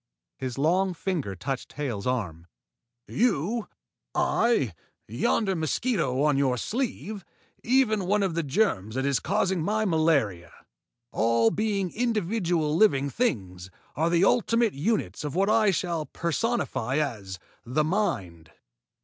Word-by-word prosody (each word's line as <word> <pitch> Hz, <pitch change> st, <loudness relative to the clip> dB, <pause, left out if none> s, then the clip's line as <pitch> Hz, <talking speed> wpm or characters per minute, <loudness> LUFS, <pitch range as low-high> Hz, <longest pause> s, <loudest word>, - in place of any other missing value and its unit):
His 130 Hz, -2 st, -5 dB
long 180 Hz, +6 st, +2 dB
finger 160 Hz, -, -3 dB
touched 130 Hz, +7 st, -5 dB
Hale's 130 Hz, -7 st, -3 dB
arm. 90 Hz, -10 st, -3 dB, 0.6 s
"You, 225 Hz, -, 0 dB, 0.5 s
I, 185 Hz, -, +2 dB, 0.3 s
yonder 190 Hz, -, 0 dB
mosquito 160 Hz, -, 0 dB
on 150 Hz, -2 st, +3 dB
your 130 Hz, -3 st, +2 dB
sleeve, 220 Hz, -, -3 dB, 0.4 s
even 225 Hz, -6 st, +2 dB
one 205 Hz, +1 st, +2 dB
of 190 Hz, -4 st, 0 dB
the 170 Hz, -, 0 dB
germs 135 Hz, -, 0 dB
that 130 Hz, +1 st, -1 dB
is 140 Hz, -3 st, +2 dB
causing 190 Hz, -2 st, 0 dB
my 215 Hz, +6 st, 0 dB
malaria, 155 Hz, -, +1 dB, 0.6 s
all 115 Hz, +1 st, +3 dB
being 200 Hz, -4 st, -1 dB
individual 185 Hz, -9 st, 0 dB
living 140 Hz, -8 st, +3 dB
things, 95 Hz, -, -2 dB, 0.3 s
are 160 Hz, +2 st, +1 dB
the 170 Hz, +2 st, +3 dB
ultimate 230 Hz, 0 st, +2 dB
units 145 Hz, -, -1 dB
of 150 Hz, 0 st, -4 dB
what 195 Hz, +3 st, +2 dB
I 220 Hz, -1 st, +4 dB
shall 170 Hz, -4 st, -1 dB
personify 165 Hz, -, -1 dB
as 105 Hz, -11 st, -3 dB, 0.3 s
the 135 Hz, +6 st, 0 dB
Mind. 150 Hz, -, -2 dB
160 Hz, 125 wpm, -26 LUFS, 130-210 Hz, 0.6 s, I